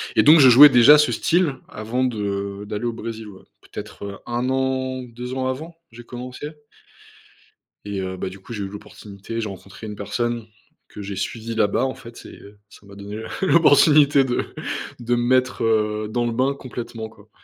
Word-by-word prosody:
et -, -, +5 dB
donc, 155 Hz, +3 st, +8 dB
je 135 Hz, -, +8 dB
jouais 145 Hz, +5 st, +10 dB
déjà 135 Hz, +4 st, +7 dB
ce 150 Hz, -, +3 dB
style 170 Hz, -5 st, +1 dB
avant 115 Hz, +4 st, -3 dB
de 100 Hz, -3 st, -3 dB
d'aller 105 Hz, +3 st, -4 dB
au 120 Hz, -, -1 dB
Brésil, 115 Hz, -1 st, -7 dB
ouais, 95 Hz, -2 st, -14 dB, 0.2 s
peut-être, -, -, -10 dB
heu, 100 Hz, -1 st, -7 dB
1 120 Hz, +2 st, -2 dB
an, 130 Hz, -1 st, -1 dB
2 125 Hz, +1 st, -8 dB
ans 130 Hz, 0 st, -2 dB
avant, 155 Hz, +6 st, -5 dB, 0.2 s
j'ai 120 Hz, +1 st, -12 dB
commencé. 125 Hz, +4 st, -8 dB, 1.4 s
Et 100 Hz, -1 st, -4 dB
heu, 95 Hz, 0 st, -5 dB
bah, 95 Hz, -, -4 dB
du 95 Hz, +1 st, -12 dB
coup, 105 Hz, +5 st, -10 dB
j'ai 105 Hz, -3 st, -4 dB
eu -, -, -4 dB
l'opportunité, 100 Hz, +2 st, -9 dB
j'ai 110 Hz, -, -4 dB
rencontré 100 Hz, +3 st, -10 dB
une 105 Hz, -, -7 dB
personne 120 Hz, +3 st, -3 dB, 0.4 s
que -, -, -10 dB
j'ai 100 Hz, 0 st, -6 dB
suivie 115 Hz, +4 st, -4 dB
là-bas, 105 Hz, +2 st, +1 dB
en 130 Hz, -, -3 dB
fait 115 Hz, -1 st, -13 dB
et -, -, -11 dB
heu, 100 Hz, 0 st, -16 dB
ça 100 Hz, -, -18 dB
m'a 100 Hz, 0 st, -14 dB
donné 100 Hz, +2 st, -8 dB, 0.2 s
l'opportunité 150 Hz, -5 st, +5 dB
de 125 Hz, -2 st, -1 dB, 0.5 s
de 120 Hz, +1 st, 0 dB
me 120 Hz, -, 0 dB
mettre, 130 Hz, 0 st, +1 dB
heu, 105 Hz, -1 st, 0 dB
dans 120 Hz, +1 st, -1 dB
le 120 Hz, -, -1 dB
bain 130 Hz, +4 st, +1 dB
complètement, 120 Hz, -4 st, -7 dB
quoi. 105 Hz, -1 st, -20 dB
115 Hz, 195 wpm, -22 LUFS, 105-130 Hz, 1.4 s, jouais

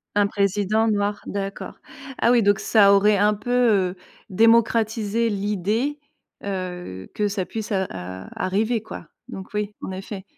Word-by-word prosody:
Un 205 Hz, -1 st, +4 dB
président 205 Hz, +2 st, +1 dB
noir 205 Hz, -1 st, 0 dB
d'accord. 195 Hz, 0 st, -5 dB, 0.4 s
Ah 235 Hz, -, +4 dB
oui 240 Hz, -, +5 dB
donc 205 Hz, 0 st, +3 dB
ça 200 Hz, -3 st, +5 dB
aurait 205 Hz, +1 st, +4 dB
un 210 Hz, +1 st, +3 dB
peu, 215 Hz, -4 st, +2 dB
heu, 180 Hz, -, -8 dB, 0.3 s
démocratisé 225 Hz, +1 st, +2 dB
l'idée, 210 Hz, +8 st, -1 dB, 0.4 s
heu, 180 Hz, -, -5 dB
que 210 Hz, -, 0 dB
ça 200 Hz, -2 st, -2 dB
puisse, 220 Hz, -1 st, -6 dB
heu, 190 Hz, -1 st, +1 dB
ar 95 Hz, 0 st, -8 dB
arriver 215 Hz, +5 st, 0 dB
quoi, 175 Hz, -, -9 dB, 0.2 s
donc 190 Hz, -1 st, -8 dB
oui, 210 Hz, 0 st, -2 dB
en -, -, -5 dB
effet. 190 Hz, +1 st, -7 dB
205 Hz, 150 wpm, -23 LUFS, 190-220 Hz, 0.4 s, oui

